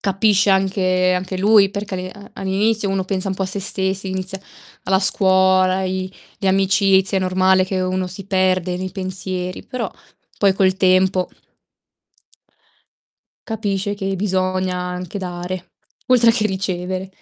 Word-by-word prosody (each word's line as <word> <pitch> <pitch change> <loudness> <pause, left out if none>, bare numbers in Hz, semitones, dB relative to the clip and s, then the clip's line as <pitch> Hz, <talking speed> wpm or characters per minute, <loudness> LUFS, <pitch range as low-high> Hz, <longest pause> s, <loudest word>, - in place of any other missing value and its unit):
capisce 200 0 +2
anche 185 -1 +2
anche 185 +1 -3
lui 200 0 +5
perché 200 -1 -5
all'i 185 0 -5
a 200 +1 -13
all'inizio 200 +2 0
uno 195 -1 0
pensa 190 0 -2
un 190 - -2
po' 195 - -3
a - - -1
sé 200 +1 -2
stessi, 190 0 -2
inizia 190 0 -4 0.4
la 190 0 +2
scuola, 190 -1 +3
i 185 0 -3 0.3
le 195 - 0
amicizie, 195 0 +3
è - - -2
normale 185 0 +3
che 185 0 -2
uno 185 0 -1
si 190 +1 -9
perde 185 -2 +1
nei 185 0 -4
pensieri. 185 -1 -4
Però, 235 -6 -4 0.5
poi, 200 -2 +4
col 190 -1 +2
tempo 185 -1 +3 2.2
capisce 205 -2 -2
che 195 -1 -3
bisogna 185 -1 -1
anche 180 +1 -5
dare, 180 0 -6 0.4
oltre 240 -2 +6
che 215 -2 +1
ricevere. 185 -1 -3
190 Hz, 145 wpm, -20 LUFS, 185-195 Hz, 2.2 s, oltre